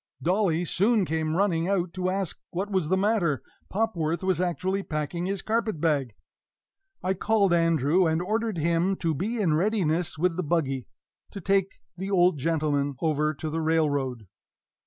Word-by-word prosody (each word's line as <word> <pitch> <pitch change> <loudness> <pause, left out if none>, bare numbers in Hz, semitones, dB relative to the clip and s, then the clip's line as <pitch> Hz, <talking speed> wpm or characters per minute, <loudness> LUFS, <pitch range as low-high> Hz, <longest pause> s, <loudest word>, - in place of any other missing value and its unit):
Dolly 180 -2 +1
soon 205 +4 +2
came 160 -1 -1
running 175 -3 +1
out 180 -3 0
to 185 0 -1
ask 190 -2 -2
what 195 +4 -3
was 185 -6 0
the 190 - +3
matter; 190 -8 +1 0.3
Popworth 180 -6 -1
was 185 -2 +1
actually 185 +2 -1
packing 165 +1 -3
his 195 -1 -3
carpet 220 -5 -1
bag! 140 -8 0 0.9
I 185 - +1
called 200 -1 +2
Andrew, 165 +1 +3
and 160 0 +1
ordered 215 +2 -1
him 170 +4 +1
to 165 -3 -1
be 215 - -2
in 175 -7 +2
readiness 175 -2 0
with 175 +1 +1
the 185 - -1
buggy 140 -6 -1 0.4
to 200 - -8
take 195 +1 0
the 190 +2 -5
old 180 -5 +3
gentleman 145 -2 0
over 155 -1 +1
to 155 +2 -4
the 165 +1 -1
railroad. 145 -7 0
175 Hz, 160 wpm, -26 LUFS, 155-195 Hz, 0.9 s, the